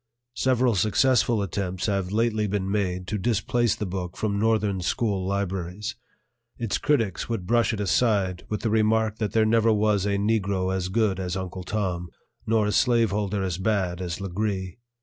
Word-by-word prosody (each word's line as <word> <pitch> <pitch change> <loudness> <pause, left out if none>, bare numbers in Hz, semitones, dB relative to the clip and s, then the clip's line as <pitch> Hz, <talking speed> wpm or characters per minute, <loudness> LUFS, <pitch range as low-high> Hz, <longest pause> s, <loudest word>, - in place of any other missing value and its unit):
Several 130 -2 +2
successful 110 +2 +2
attempts 95 -1 -3
have 100 -3 -1
lately 110 -1 +1
been 100 -1 -2
made 90 -3 -1
to 105 +2 -3
displace 120 +3 +1
the 105 - -4
book 90 -2 -5
from 100 -2 -1
Northern 105 -3 +1
school 100 -1 -1
libraries. 95 0 -3 0.6
Its 115 -4 -1
critics 115 -12 0
would 115 -6 -2
brush 120 +3 +2
it 110 - -4
aside 100 -3 +1
with 105 - -2
the 110 - 0
remark 110 0 +2
that 105 -2 -2
there 110 -1 +4
never 115 +1 +3
was 105 -2 +2
a 100 0 +1
Negro 100 -3 0
as 90 -1 -2
good 100 -2 +1
as 90 0 -2
Uncle 95 0 -5
Tom, 90 -4 -2 0.4
nor 110 -1 +3
a 105 - 0
slave 115 -1 +3
holder 100 -1 -1
as 90 -2 -2
bad 95 -3 0
as 85 -1 -4
Legree. 95 0 -3
105 Hz, 170 wpm, -25 LUFS, 95-110 Hz, 0.6 s, there